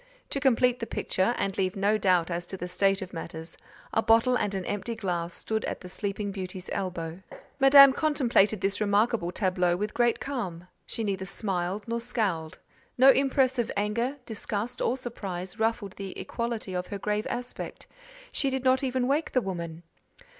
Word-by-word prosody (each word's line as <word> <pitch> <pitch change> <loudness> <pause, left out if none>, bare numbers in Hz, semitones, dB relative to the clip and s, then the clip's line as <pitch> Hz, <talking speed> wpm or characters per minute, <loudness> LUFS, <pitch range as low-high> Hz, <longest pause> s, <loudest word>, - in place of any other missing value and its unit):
To 275 - 0
complete 250 -2 +3
the 230 - -4
picture, 190 +6 0
and 195 -1 -1
leave 185 -1 0
no 200 +2 +2
doubt 180 -4 +2
as 170 0 -3
to 190 - -6
the 180 - -5
state 195 +2 +1
of 185 - -10
matters, 165 -1 -6 0.4
a 225 - +3
bottle 230 +3 +4
and 205 -5 0
an 190 -2 -3
empty 205 +3 -3
glass 175 -4 -2
stood 220 +4 -1
at - - -4
the 180 - -8
sleeping 200 +1 -2
beauty's 185 -1 -6
elbow. 175 -2 -4 0.4
Madame 275 0 +9
contemplated 240 -10 +2
this 195 +2 0
remarkable 205 -2 +2
tableau 180 -2 +1
with 210 +2 -3
great 240 -1 +2
calm; 185 -11 -4 0.2
she 225 - -2
neither 195 -2 -2
smiled 190 0 -2
nor 230 0 -1
scowled; 205 -10 -1 0.4
no 265 +2 +8
impress 265 -1 +2
of 235 - 0
anger, 235 +7 0
disgust, 220 +1 -3
or 255 - +1
surprise, 195 -6 -5
ruffled 225 -3 0
the 195 -2 -6
equality 235 -5 -4
of 180 0 -2
her 200 - -4
grave 210 +2 -1
aspect; 245 +1 -5 0.5
she 275 - 0
did 265 -1 -2
not 260 +1 +3
even 255 -1 0
wake 295 +4 0
the 255 - +4
woman! 170 -4 -5
205 Hz, 175 wpm, -28 LUFS, 185-240 Hz, 0.5 s, Madame